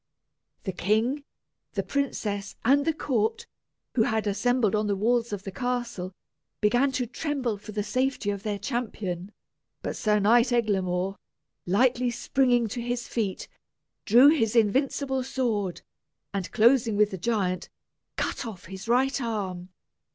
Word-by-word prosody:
The 190 - -2
king, 220 - 0 0.5
the - - -1
princess, 210 -8 -2
and 280 +3 +4
the 325 - +2
court, 280 - -1 0.5
who 240 - +2
had 220 -1 +1
assembled 215 +2 +1
on 210 0 +1
the 200 - +1
walls 235 +3 +1
of 200 -2 -4
the 195 - -6
castle, 240 -3 -3 0.5
began 245 +6 +3
to 250 -1 0
tremble 255 -1 -2
for 210 +1 -9
the 210 0 -2
safety 255 0 0
of 200 -1 -4
their 210 -1 -2
champion. 205 -5 -3 0.5
But - - -3
Sir 210 -2 +2
Eglamour, 205 -5 +2 0.5
lightly 245 +6 +3
springing 245 -1 +2
to 240 +3 -4
his 240 0 -3
feet, 210 -5 -2 0.6
drew 245 +6 +8
his 235 -8 +2
invincible 265 +4 +2
sword, 225 -8 -2 0.5
and 195 -3 -3
closing 230 -1 +4
with 210 0 +4
the 190 - -5
giant, 185 -3 -1 0.5
cut - - -2
off 215 -7 -8
his 190 +3 -8
right 265 +3 +2
arm. 190 -6 -3
225 Hz, 140 wpm, -27 LUFS, 200-250 Hz, 0.6 s, drew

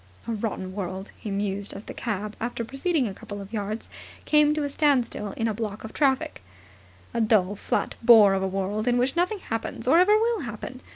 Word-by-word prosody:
"A - - -1
rotten 200 -4 -3
world," 190 0 -5
he 215 - -7
mused, 200 0 -2
as 200 - -8
the - - -8
cab, 210 -2 -4
after 235 0 -3
proceeding 270 +2 0
a 200 - -5
couple 205 +1 -8
of 200 +2 -10
yards, 215 +1 -3 0.4
came 300 -1 +5
to 305 - -1
a 285 - -1
standstill 265 -8 +1
in 225 - -1
a 220 - 0
block 210 -1 -5
of 220 - -7
the - - -10
traffic. 270 -3 +1 0.7
"A 235 - 0
dull, 210 -3 +3
flat - - -1
bore 225 -4 +8
of 190 - 0
a 190 - 0
world, 195 +4 -2
in 245 0 +3
which 255 +4 +1
nothing 360 +5 +1
happens 225 - -4
or 325 +6 +6
ever 415 +4 +6
will 455 0 +1
happen. 250 - -7
225 Hz, 215 wpm, -26 LUFS, 205-270 Hz, 0.7 s, bore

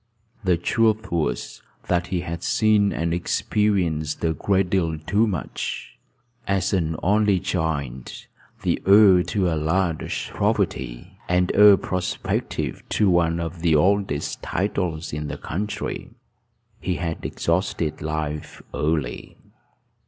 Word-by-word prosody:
The 90 -3 +3
truth 110 +4 +1
was, 85 -3 -2 0.3
that 90 0 +1
he 90 -1 -1
had 85 -1 -5
seen 105 0 +3
and 85 0 -1
experienced 85 -4 0
a 80 - +2
great 95 +3 0
deal 85 -4 +1
too 100 +9 +1
much. 95 -7 -4 0.5
As 100 0 0
an 80 -4 0
only 105 0 +3
child, 75 -9 -2 0.5
the - - 0
heir 100 -2 +7
to 95 +1 0
a 85 - +1
large 80 +2 -1
property, 65 +10 -2
and 90 0 +2
heir 105 -1 +8
prospective 90 -1 -2
to 100 -3 +3
one 85 -1 +2
of 85 0 -5
the 80 -2 +3
oldest 95 -2 +1
titles 90 -5 -2
in 75 +1 -3
the - - -5
country, 105 +6 -4 0.7
he 90 - -2
had 85 -2 -4
exhausted 85 -2 -1
life 75 -1 -4
early. 75 -5 -2
85 Hz, 125 wpm, -23 LUFS, 80-95 Hz, 0.7 s, heir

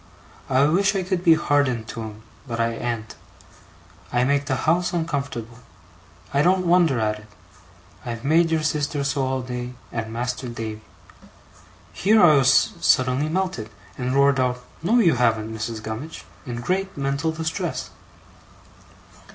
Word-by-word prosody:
I 130 +1 +4
wish 190 +7 +3
I 190 - 0
could 185 -1 -2
be 165 -3 +7
hardened 140 -7 +1
to 115 - -6
'em, 110 -1 -8 0.2
but 115 -2 -4
I 115 0 +2
an't. 115 -1 -4 1.0
I 120 0 +2
make 140 +2 +1
the 135 - +1
house 175 +3 +2
uncomfortable. 140 -8 -3 0.7
I 140 - +3
don't 185 +2 +3
wonder 170 -7 +4
at 105 -1 0
it. 105 - -16 0.8
I've 115 -1 -5
made 165 +4 +3
your 160 -1 0
sister 150 -2 -1
so 140 0 0
all 130 0 -1
day, 125 0 -5 0.2
and 110 -1 -4
Master 125 +2 -3
Davy.' 110 -2 -6 1.1
Here 215 +3 +3
I 175 -6 +7
was 135 - +4
suddenly 130 +3 +2
melted, 165 - -2 0.3
and 125 +3 -2
roared 140 -1 +4
out, 125 -1 0 0.2
'No, 215 +9 +2
you 170 - +4
haven't, 110 -2 +1
Mrs. 110 0 -5
Gummidge,' 115 +10 -6 0.2
in 120 -1 -4
great 190 +8 -2
mental 140 +3 -1
distress. 160 0 -3
135 Hz, 150 wpm, -23 LUFS, 120-160 Hz, 1.1 s, be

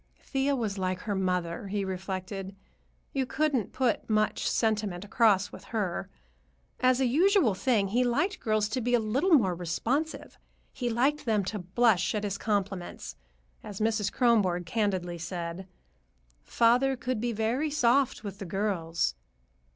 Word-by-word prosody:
Thea 275 +1 0
was 210 -6 -2
like 185 0 -1
her 210 - -3
mother, 180 -1 -1
he 200 0 -2
reflected; 190 +1 -5 0.6
you 265 -2 0
couldn't 275 -5 0
put 250 -4 0
much 215 0 +1
sentiment 210 -4 0
across 205 -2 +3
with - - -11
her. 200 -7 -3 0.7
As 255 0 +3
a 265 - +3
usual 325 - +4
thing, 205 -1 +1
he 245 +5 +2
liked 290 - 0
girls 215 -1 +1
to 255 +3 -2
be 245 +1 +2
a - - +3
little 260 - +1
more 195 -10 +3
responsive. 225 - -3 0.3
He 245 -2 -2
liked 270 +6 +1
them 215 -3 +2
to 210 +2 -3
blush 195 +2 +2
at 210 - -2
his 200 -1 -3
compliments; 200 -4 -3 0.5
as 205 -3 -8
Mrs. 215 -2 0
Kronborg 200 -8 +2
candidly 185 -4 -1
said, 170 +2 -5 0.7
"Father 245 +3 +3
could 245 -2 -2
be 240 0 0
very 230 +7 0
soft 270 -3 +2
with 200 -2 -7
the 195 - -5
girls." 175 -3 -1
215 Hz, 150 wpm, -28 LUFS, 190-245 Hz, 0.7 s, usual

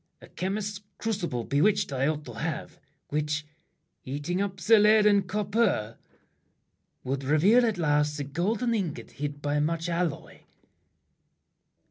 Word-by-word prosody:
a - - -14
chemist's 200 +2 -3 0.2
crucible 175 - -2
Bewitched 145 - +2
I 135 +1 +1
ought 150 -1 -2
to 120 - -8
have, 110 - -5 0.3
which, 150 0 -1 0.6
eating 145 +8 -3
up 200 -1 -2
The 220 +5 +5
lead 210 0 +5
and 200 -2 +4
copper, 200 - 0 1.0
would 135 +1 -2
reveal 175 - +4
at 215 -4 -1
last 150 -2 +1
The 145 - -3
golden 200 - -1
ingot 165 - -3
hid 145 +1 -5
by 145 0 0
much 165 +3 -1
alloy. 170 -2 -2
165 Hz, 130 wpm, -27 LUFS, 145-205 Hz, 1.0 s, The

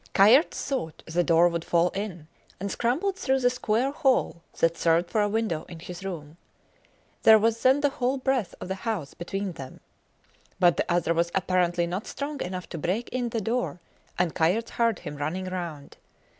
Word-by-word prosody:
Kayerts 225 - +5
thought 255 - -4
the 175 +2 0
door 170 0 +5
would 170 -1 -2
fall 170 +1 +2
in, 190 -6 -5 0.3
and 200 +1 -3
scrambled 315 - 0
through 265 0 +1
the 245 -1 +3
square 245 +1 0
hole 265 - +1 0.2
that 165 0 +2
served 170 +1 +2
for 215 - +2
a 205 - +1
window 215 -7 -1
in 170 - -9
his 175 +2 -8
room. 165 -5 -7 0.8
There 220 0 +8
was 225 +1 +1
then 265 +3 +4
the 290 - +3
whole 260 +1 -1
breadth 260 -6 -1
of - - -6
the 190 - -2
house 210 -11 -3
between 195 +2 -4
them. 135 -6 -10 0.8
But 175 -2 +4
the - - -1
other 175 -1 +2
was 170 +1 +1
apparently 180 -2 +1
not 185 +5 -4
strong 285 0 -5
enough 180 0 -4
to 165 - -6
break 205 +10 -2
in 245 -2 -2
the 225 -1 -2
door, 230 -3 -2 0.4
and 175 -2 +1
Kayerts 185 +8 +1
heard 230 -4 +1
him 150 - -8
running 160 +6 -3
round. 170 -6 -6
190 Hz, 185 wpm, -26 LUFS, 170-235 Hz, 0.8 s, There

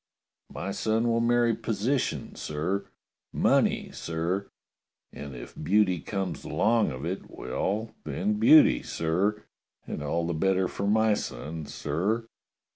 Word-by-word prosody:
My 100 - -4
son 110 +3 0
will 115 0 +2
marry 120 0 +3
position, 115 +5 -1
sir 80 +7 -3 0.2
— - - -62 0.2
money, - - +2
sir 85 +4 -2 0.3
— - - -53
and 70 -2 -8
if - - -9
beauty 95 -3 +2
comes 95 +4 -4
along 115 0 +2
of 65 +3 -6
it, 95 +3 -4
well, 110 +4 -3
then, 210 +1 -1
beauty, 290 +5 +7
sir, 95 +6 -1 0.4
and - - -5
all 85 +3 -1
the 85 - -1
better 95 +3 +2
for 100 +3 -3
my 110 +1 +4
son, 80 -3 -5
sir." 100 +10 -1
100 Hz, 135 wpm, -28 LUFS, 85-115 Hz, 0.4 s, beauty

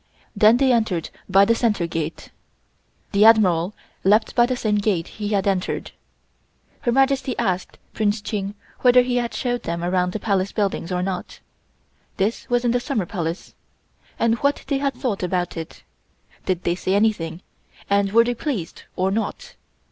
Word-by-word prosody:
Then 215 +3 +6
they 265 0 +3
entered 220 -8 0 0.2
by 195 +1 +6
the 230 - +3
center 215 -6 +1
gate. 165 -1 -5 0.8
The 200 0 +4
Admiral 200 -4 +5 0.3
left 210 +3 +3
by 240 -1 +4
the 255 - -1
same 215 -4 0
gate 200 -5 0
he 210 -1 -6
had 200 -2 0
entered. 190 -2 -1 0.9
Her 240 - 0
Majesty 270 0 +2
asked 185 -5 -2 0.2
Prince 215 0 0
Ching 205 -1 -4 0.2
whether 250 0 +6
he 245 0 -1
had 240 -1 -2
showed 245 -1 -1
them 170 0 -4
around 180 0 0
the 215 - -3
Palace 200 -2 0
buildings 195 -4 -1
or 180 0 0
not 185 -1 -4 0.8
(this 205 +4 -1
was 245 0 +1
in 240 - +3
the 245 - +2
Summer 240 -6 -2
Palace), 170 -2 -4 0.6
and 230 0 +1
what 280 +1 0
they 275 -2 -1
had 275 -1 -1
thought 225 -7 -2
about 180 -1 -1
it. 165 -1 -8 0.6
Did 185 -2 -1
they 170 - +1
say 185 +2 -1
anything, 185 -5 0 0.4
and 200 0 +2
were 230 +2 +6
they 245 +1 -1
pleased 230 - -4
or 190 +1 0
not. 225 - -3
205 Hz, 170 wpm, -22 LUFS, 185-240 Hz, 0.9 s, Then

